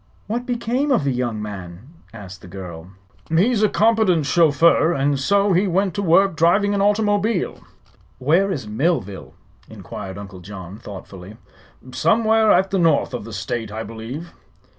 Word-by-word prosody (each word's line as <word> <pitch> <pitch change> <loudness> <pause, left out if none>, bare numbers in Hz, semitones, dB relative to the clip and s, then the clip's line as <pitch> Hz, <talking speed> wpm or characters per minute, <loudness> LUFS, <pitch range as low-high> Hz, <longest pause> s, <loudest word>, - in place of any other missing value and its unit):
"What 240 +4 -4
became 245 +4 -1
of 250 - +2
the 140 - 0
young 120 -4 -2
man?" 95 +2 -9 0.2
asked 95 -4 -11
the - - -12
girl. 90 -3 -9 0.4
"He's 205 +8 +2
a 215 - +4
competent 215 -8 +2
chauffeur, 165 +1 +4
and 140 -1 0
so 200 +7 +2
he 185 +3 +2
went 190 +1 0
to 200 - -2
work 190 0 +3
driving 185 +5 +3
an 200 - 0
automobile." 205 0 +1 0.6
"Where 170 +10 +2
is 135 - -4
Millville?" 105 - -2 0.3
inquired 95 0 -8
Uncle 100 -2 -9
John, 95 +1 -10
thoughtfully. 100 -1 -10 0.5
"Somewhere 220 - +3
at 190 +1 +3
the 195 - +1
north 160 -6 +2
of 125 - -5
the 115 - -9
State, 105 +2 -4
I 110 +1 -5
believe." 120 +10 -8
160 Hz, 155 wpm, -21 LUFS, -, 0.6 s, a